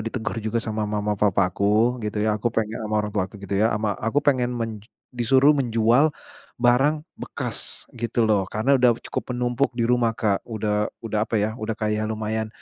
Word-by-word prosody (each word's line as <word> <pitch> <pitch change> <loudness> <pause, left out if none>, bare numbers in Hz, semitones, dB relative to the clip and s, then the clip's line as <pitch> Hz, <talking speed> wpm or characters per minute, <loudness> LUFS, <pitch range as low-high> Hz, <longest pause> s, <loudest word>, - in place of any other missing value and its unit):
ditegur 110 0 -4
juga 110 +2 -2
sama 110 -2 -2
mama 105 0 -1
papa 95 -3 +2
aku, 110 +6 +2
gitu 105 -1 -2
ya, 110 - +2
aku 120 - +1
penge 110 0 -2
ama 110 0 -2
orang 105 - -5
tuaku 100 0 -2
gitu 100 +1 -1
ya 110 - +4
ama 105 -1 0
aku 135 +7 0
pengen 125 -3 +2
menj 110 -1 -5 0.2
disuruh 130 +4 +4
menjual, 120 +1 +3 0.5
barang 135 +6 +3 0.2
bekas - - -4
gitu 120 -1 -1
loh 100 -3 +2
karena 110 +6 0
udah 120 -2 +5
cukup 125 - -4
menumpuk 125 +2 +1
di 115 - +1
rumah 120 -2 +2
Kak, 100 -3 +1
udah 105 -2 -1 0.2
udah 110 -1 -1
apa 115 - 0
ya 105 +1 +1
udah 110 0 -3
kayak 110 0 -1
lumayan, 110 0 -2
110 Hz, 185 wpm, -24 LUFS, 105-120 Hz, 0.5 s, udah